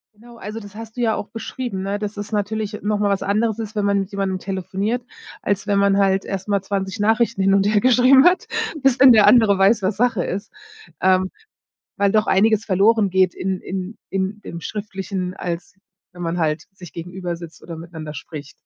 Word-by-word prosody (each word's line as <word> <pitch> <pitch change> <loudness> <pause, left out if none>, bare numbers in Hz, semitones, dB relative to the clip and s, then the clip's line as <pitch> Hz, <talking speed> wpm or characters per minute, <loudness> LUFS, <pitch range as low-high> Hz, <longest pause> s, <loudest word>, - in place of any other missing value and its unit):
Genau, 235 +2 -16
also 215 +2 -6
das 205 -1 -12
hast 225 +1 -9
du 245 - -4
ja 225 -2 +2
auch - - -5
beschrieben, 230 -3 -5
ne, 200 +1 -2
dass 210 0 -5
es 205 +2 -6
natürlich 210 0 -2
noch 210 0 0
mal 205 -1 +2
was 195 0 0
anderes 215 +2 0
ist, 220 -1 -6
wenn 210 - 0
man 200 0 +2
mit 195 +2 -7
jemandem 195 -1 -1
telefoniert, 195 +5 -3 0.4
als 200 -1 -1
wenn 200 -1 +1
man 200 0 +3
halt 195 -1 +2
erst 195 0 -5
mal 200 -2 +1
20 195 +1 -3
Nachrichten 225 0 +2
hin 195 +1 +4
und 195 0 +3
hergeschrieben 250 +5 +5
hat, 360 +1 +4 0.4
bis 270 -1 +3
denn 265 -1 +9
der 215 -2 +7
andere 220 -5 +5
weiß, 200 +2 +4
was 190 +2 -1
Sache 235 -6 +1
ist. 200 +2 -5 0.5
Ähm, 185 0 +3 0.6
weil 200 -1 +2
doch 215 0 +2
einiges 215 +2 +3
verloren 205 +1 +3
geht 185 -1 +2
in 190 0 -3
in 190 +3 -5
in 195 +2 -2
im 170 - -7
Schriftlichen, 195 -2 -5
als 175 -1 -5 0.4
wenn 175 0 -11
man 170 +1 -2
halt 155 -1 -1
sich 180 -4 -12
gegenübersitzt 175 -1 -7
oder 165 -1 -8
miteinander 160 -2 -8
spricht. 150 -1 -9
200 Hz, 200 wpm, -21 LUFS, 190-215 Hz, 0.6 s, denn